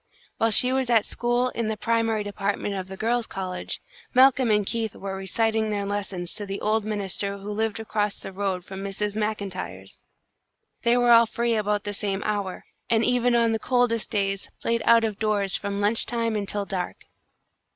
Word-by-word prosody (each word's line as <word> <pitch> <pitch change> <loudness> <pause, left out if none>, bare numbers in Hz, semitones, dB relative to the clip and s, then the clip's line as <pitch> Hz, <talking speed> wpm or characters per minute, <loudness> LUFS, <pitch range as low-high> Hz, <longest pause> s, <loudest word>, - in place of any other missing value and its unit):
While 225 - +2
she 250 +4 +6
was 265 -2 0
at 225 -3 +4
school 240 +1 0
in 230 -3 -3
the 220 0 -2
primary 225 -1 +1
department 205 0 -2
of 190 -1 -4
the 190 0 -8
Girls' 235 +2 0
College, 185 -1 -4 0.4
Malcolm 260 -1 +6
and 210 -1 +3
Keith 225 0 -2
were 195 -1 -5
reciting 220 +3 0
their 205 -1 -1
lessons 195 -3 -3
to 205 - -5
the 195 +1 -4
old 215 +1 +1
minister 200 -1 -2
who 200 +1 -7
lived 220 +1 -1
across 210 -2 -1
the 195 - -7
road 190 -2 -2
from 190 0 -7
Mrs. 200 +1 -2
MacIntyre's. 210 -3 -4 0.8
They 235 +1 +3
were 245 -1 +4
all 230 0 +7
free 235 +1 0
about 210 -1 0
the 205 - -4
same 200 -1 -2
hour, 200 -3 -2 0.2
and 225 -1 +3
even 245 -1 +2
on 230 -1 +3
the 225 - 0
coldest 245 -2 +1
days 195 -1 -1
played 230 0 0
out 230 0 +6
of 215 -2 -2
doors 205 -3 +1
from 200 0 -3
lunch 210 +3 +3
time 230 -2 -1
until 205 0 -2
dark. 185 -3 -3
210 Hz, 185 wpm, -25 LUFS, 200-230 Hz, 0.8 s, all